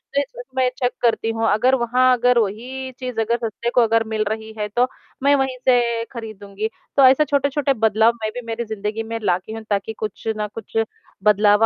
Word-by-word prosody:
तो 280 - +4
इसमें 280 - -2
चेक 245 -2 +1
करती 230 -1 +2
हूँ। 225 0 0
अगर 250 +5 +3
वहाँ 255 +2 +4
अगर 245 0 +3
वही 250 +6 -3
चीज़ 250 -3 -4
अगर 235 +2 +1
सस्ते 235 +2 -3
को 245 - +6
अगर 225 0 +3
मिल 220 -1 0
रही 220 0 -5
है 210 - -1
तो 245 +1 +4 0.4
मैं 285 0 +5
वहीं 265 -2 0
से 235 -2 +3
खरीदूँगी। 215 -3 -5 0.3
तो 275 - +7
ऐसा 265 +4 +5
छोटे-छोटे 280 -1 +1
बदलाव 220 0 +3
मैं 215 - -1
भी 245 - -4
मेरी 230 +1 -3
ज़िन्दगी 215 +1 -3
में 225 +1 -4
ला 180 -3 +3
की 220 +4 -10
हूँ 225 - -6
ताकि 205 +2 -1
कुछ 215 0 -6
ना 210 - -2
कुछ 220 +1 -8 0.5
बदलाव 210 +1 +5
225 Hz, 200 wpm, -21 LUFS, 215-255 Hz, 0.5 s, तो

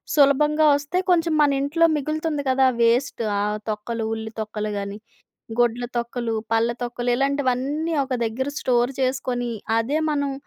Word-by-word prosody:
సులభంగా 300 +2 +4
ఒస్తే 285 +5 -2
కొంచెం 335 -2 +3
మన 290 -1 +4
ఇంట్లో 310 +4 +2
మిగులుతుంది 305 +1 -2
కదా! 265 0 +4 0.2
వేస్ట్ 235 +3 +2 0.2
ఆ - - +1 0.3
తొక్కలు 225 +2 -3
ఉల్లి 220 0 -5
తొక్కలు 215 0 -3
గాని, 200 0 -4 0.6
గుడ్ల 240 0 +2
తొక్కలు, 235 -1 -2 0.2
పళ్ళ 225 +1 +3
తొక్కలు 245 0 -2
ఇలాంటివన్నీ 280 +3 0
ఒక 260 -1 -3
దగ్గర 240 +5 -2
స్టోర్ 245 0 +1
చేసుకొని 255 -2 -1 0.3
అదే 240 +7 +1
మనం 285 -2 0
260 Hz, 140 wpm, -23 LUFS, 235-285 Hz, 0.6 s, సులభంగా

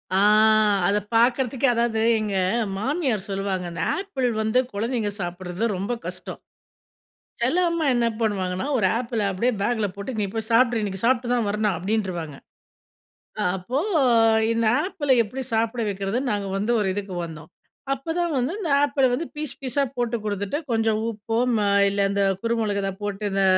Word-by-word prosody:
ஆ! - - +4 0.7
அத 205 - +2 0.2
பார்க்குறதுக்கே 250 +3 +2
அதாவது 235 -1 0 0.2
எங்க 210 -2 -2 0.4
மாமியார் 255 - -1
சொல்லுவாங்க, 195 -2 -2
அந்த 170 - -5 0.2
ஆப்பிள் 325 -11 -2
வந்து 220 +3 +2
குழந்தைங்க 225 +1 -1
சாப்பிடுறதுல 180 +4 -3
ரொம்ப 200 +6 -2
கஷ்டம். - - -6 1.0
சில 255 +8 +1
அம்மா 335 -1 -1
என்ன 240 -1 +2
பண்ணுவாங்கன்னா, 190 -1 -1
ஒரு 190 - +3
ஆப்பிள 235 -3 -2
அப்படியே 235 +7 0
பேக்குல 220 -2 0
போட்டு 200 +6 -5
"நீ 205 - +1
போய் 220 0 -3
சாப்ட்ரு, 235 0 +4
இன்னைக்கு 190 -2 -3
சாப்ட்டு 245 0 +2
தான் 235 -3 0
வரணும்" 210 -1 0
அப்படின்றுவாங்க. 180 -6 -2 1.0
அ - - +1
அப்போ 240 +10 -2 0.7
இந்த 230 0 0 0.2
ஆப்பிள 290 -7 -2
எப்படி 260 +5 -6
சாப்பிட 230 +1 0
வைக்கிறதுன்னு, 200 +6 -2
நாங்க 200 -1 -2
வந்து 210 +4 0
ஒரு 200 - 0
இதுக்கு 200 -2 -5
வந்தோம். 160 -1 -11 0.4
அப்போதான் 330 +4 -2
வந்து 255 +8 -1
இந்த 340 -8 -2
ஆப்பிள 280 -2 +2
வந்து 315 +7 -1
பீஸ் 300 -2 -4
பீஸா 270 +2 0
போட்டு 240 -1 0
கொடுத்துட்டு 205 +4 -2
கொஞ்சம் 225 -1 +1
உப்போ, 225 +2 -4 0.2
ம - - +1 0.3
இல்ல 200 0 -3
இந்த 200 0 +1 0.2
குறுமிளகு 225 -3 0
இத 195 - 0
போட்டு 205 0 -4
இந்த 195 0 +2
220 Hz, 155 wpm, -24 LUFS, 200-250 Hz, 1.0 s, ஆ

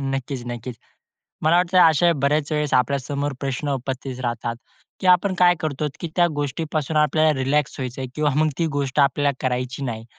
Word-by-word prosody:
नक्कीच-नक्कीच. 125 -2 -5 0.7
मला 160 +2 +4
वाटतं 180 +1 +2
अशा 165 0 +5
बऱ्याच 145 +1 +1
वेळेस 150 -1 -1
आपल्या 130 +2 +3
समोर 140 +2 -3
प्रश्न 140 +1 -3
उपस्थित 130 0 -5
राहतात, 120 -1 -3 0.4
की 185 - -2
आपण 185 +2 +4
काय 175 -1 +5
करतो, 150 -1 -2
की 170 - -4
त्या 175 -1 +4
गोष्टीपासून 150 +1 -2
आपल्याला 155 +1 +3
रिलॅक्स 140 +2 0
व्हायचंय 130 0 -4
किंवा 150 -2 +1
मग 155 +1 +3
ती 165 - +1
गोष्ट 140 0 -1
आपल्याला 140 0 +3
करायची 125 +1 -2
नाही. 115 -3 -4
140 Hz, 165 wpm, -22 LUFS, 130-155 Hz, 0.7 s, अशा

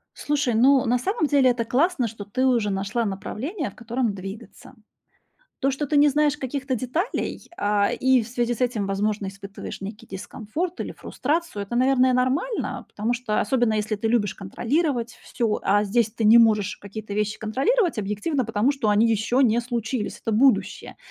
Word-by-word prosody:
Слушай, 290 -5 0
ну, 265 +2 +5
на 245 +2 +2
самом 320 - 0
деле- 275 -3 +4
это 240 -1 -1
классно, 270 0 +1
что 210 -1 -8
ты 255 +6 -1
уже 235 -5 +2
нашла 200 +4 -1
направление, 255 - -4
в - - -17
котором 235 -1 -2
двигаться. 195 +3 -10 0.9
То, 270 +1 +1
что 285 +2 -3
ты 295 - +2
не 290 0 +6
знаешь 300 +1 +2
каких-то 270 0 -3
деталей, 260 - -3
а, 205 0 +2
и 260 -1 +3
в 220 - -7
связи 240 0 -1
с 240 - -7
этим, 235 -5 0
возможно, 200 +1 -1
испытываешь 200 0 -8
некий 210 +3 -7
дискомфорт, 220 - -5
или - - -5
фрустрацию, 300 -6 -3
это, 200 +4 -6
наверное, 255 0 +3
нормально, 265 - -1
потому 220 +4 -2
что 240 -3 -1
особенно 240 -1 +1
если 215 0 -1
ты 225 +2 -2
любишь 220 -4 +1
контролировать 240 - -1
всё, 225 -3 -1
а 205 +2 +3
здесь 220 +1 +1
ты 225 - -4
не 225 +2 +8
можешь 215 -4 +3
какие-то 205 +1 -8
вещи 210 +1 -1
контролировать 290 - +1
объективно, 215 +7 -1
потому 225 +4 +1
что 250 -7 -1
они 220 +3 +4
ещё 225 +4 +1
не 235 -2 +4
случились, 235 -1 -3
это 225 - -3
будущее, 260 +3 +1
235 Hz, 175 wpm, -24 LUFS, 210-265 Hz, 0.9 s, не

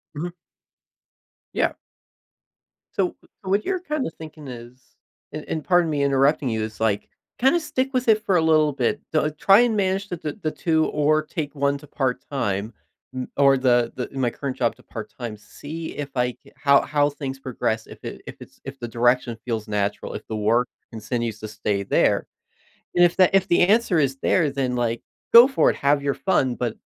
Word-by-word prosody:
Mhm. 170 +4 -4 1.2
Yeah. - - +1 1.2
So, 190 -4 0
wh 195 - -18
what 200 +3 +1
you're 380 -1 0
kinda 305 - -2
thinking 155 -2 -11
is, 125 +1 -11 0.4
and 155 - -6
and 155 - -3
pardon 175 -2 +3
me 145 -2 0
interrupting 140 +1 +2
you, 110 -1 -1
it's 110 0 -7
like, 110 -2 0 0.3
kinda 270 +8 +4
stick 265 -4 -2
with 255 -1 0
it 215 -1 +4
for 200 -4 +1
a - - +3
little 155 -2 +4
bit, 125 -3 -1
though 155 -1 +2
try 195 +8 +5
and 240 -2 +2
manage 195 0 0
the 175 - -4
the 150 -2 -4
the 155 - -1
2 160 -1 +1
or 150 +1 +2
take 150 -1 -5
one 140 0 +1
to 150 - -15
part-time 125 -7 -2 0.4
n 130 0 -3
or 140 -1 +5
the 120 -2 +2
the, 125 - -3
in 135 - -7
my 125 - +2
current 135 +2 -5
job 120 -2 0
to - - -21
part-time, 110 +1 -7
see 155 +9 -8
if 145 -1 -4
I 125 0 +1
ca - - -22
how 140 -1 +4
how 145 -1 +1
things 135 -2 -6
progress, 110 -4 -2
if - - -13
it - - -7
if - - -7
it's - - -15
if 135 0 -8
the 120 - -5
direction 120 0 +1
feels 115 -3 -3
natural, 105 -1 -2
if - - -8
the 110 - -4
work 115 +4 +2 0.2
continues 115 -1 -3
to 110 - -6
stay 105 -1 -2
there. 100 - +2 0.7
And 175 - +5
if 175 -1 +3
the 185 0 +5
if 190 -1 +3
the 175 - +4
answer 210 -4 +3
is 135 -2 +1
there, 155 +2 +2
then 135 -2 -1
like, 120 -1 -1 0.3
go 235 +2 +11
for 270 - +3
it, - - -1
have 140 +1 +2
your 140 0 0
fun, 130 -10 +1
but 120 -3 -3
140 Hz, 200 wpm, -23 LUFS, 120-165 Hz, 1.2 s, go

